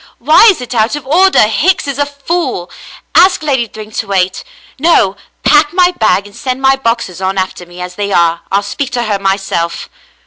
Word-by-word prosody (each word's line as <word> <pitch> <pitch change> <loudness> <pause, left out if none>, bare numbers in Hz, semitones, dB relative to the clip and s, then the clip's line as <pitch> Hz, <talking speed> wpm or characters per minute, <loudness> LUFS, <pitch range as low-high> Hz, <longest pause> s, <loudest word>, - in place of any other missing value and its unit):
"Why 305 - +5
is 370 -10 +1
it 250 - -6
out 225 +3 +1
of 295 -3 -7
order? 365 +5 +4
Hicks 295 - +1
is 280 0 -4
a 285 - +1
fool. 285 - -3 0.4
Ask 365 -4 +4
Lady 265 -6 0
Thryng 215 0 -11
to 220 - -4
wait. 185 -2 -1 0.4
No, 265 - +3 0.3
pack 295 +1 +3
my 360 0 +3
bag 215 - +1
and 205 -1 -14
send 260 -2 -4
my 270 0 +3
boxes 230 -8 -3
on 190 +1 -2
after 185 -2 -3
me 175 +1 -13
as 180 0 -6
they 200 +1 -4
are. 170 -2 +2
I'll 200 +1 +1
speak 260 +6 -4
to 240 -1 -1
her 210 -3 -2
myself." 195 -3 -2
230 Hz, 200 wpm, -12 LUFS, 195-290 Hz, 0.4 s, Why